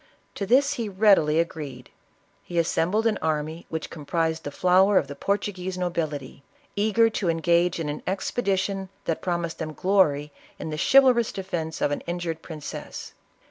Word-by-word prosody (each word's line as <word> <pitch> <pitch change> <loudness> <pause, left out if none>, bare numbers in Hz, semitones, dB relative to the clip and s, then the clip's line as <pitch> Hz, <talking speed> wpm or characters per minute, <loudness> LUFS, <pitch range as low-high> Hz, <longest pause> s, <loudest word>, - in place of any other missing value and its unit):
To 200 - -4
this 280 +5 +4
he 220 - -2
readily 190 -6 +4
agreed. 150 -7 -4 0.5
He 175 - -6
assembled 175 +6 +1
an 220 -3 +2
army 155 +1 -2
which 160 -1 -5
comprised 160 +1 -2
the - - -2
flower 185 +6 +4
of - - +3
the 140 - -7
Portuguese 190 +1 -2
nobility, 155 -7 -3 0.3
eager 215 +2 +3
to 195 -5 -1
engage 170 +1 +2
in 160 - -2
an 145 0 -4
expedi 195 +1 0
tion 195 0 -2 0.2
that 165 - -1
promised 170 -2 -2
them 155 -1 -4
glory 150 -6 +2 0.3
in 160 - -5
the 155 - -4
chivalrous 255 -4 +6
defence 175 -4 -4
of 145 - +2
an 145 - -2
injured 170 -2 -3
princess. 155 -3 -8
175 Hz, 160 wpm, -25 LUFS, 160-195 Hz, 0.5 s, chivalrous